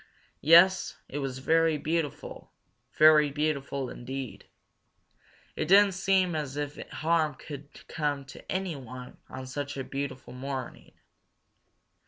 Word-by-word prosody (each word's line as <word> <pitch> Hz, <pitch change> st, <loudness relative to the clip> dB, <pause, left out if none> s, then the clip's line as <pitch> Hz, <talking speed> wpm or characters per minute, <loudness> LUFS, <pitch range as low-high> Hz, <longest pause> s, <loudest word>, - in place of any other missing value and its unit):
Yes, 175 Hz, +5 st, +6 dB
it 145 Hz, -, -5 dB
was 135 Hz, -2 st, -3 dB
very 160 Hz, +3 st, +2 dB
beautiful, 155 Hz, 0 st, -3 dB, 0.5 s
very 155 Hz, -1 st, +7 dB
beautiful 140 Hz, -2 st, -2 dB
indeed. 130 Hz, -1 st, -7 dB, 1.1 s
It -, -, -2 dB
didn't 200 Hz, +2 st, +7 dB
seem 190 Hz, -1 st, +2 dB
as 145 Hz, -3 st, -3 dB
if 145 Hz, -1 st, -3 dB
harm 160 Hz, -1 st, +1 dB
could 145 Hz, -1 st, -11 dB
come 145 Hz, -3 st, -2 dB
to 135 Hz, -, -11 dB
anyone 135 Hz, -10 st, -5 dB
on 130 Hz, -, -7 dB
such 140 Hz, +2 st, -5 dB
a 135 Hz, -, -3 dB
beautiful 135 Hz, -2 st, -5 dB
morning. 130 Hz, 0 st, -6 dB
145 Hz, 115 wpm, -28 LUFS, 135-160 Hz, 1.1 s, very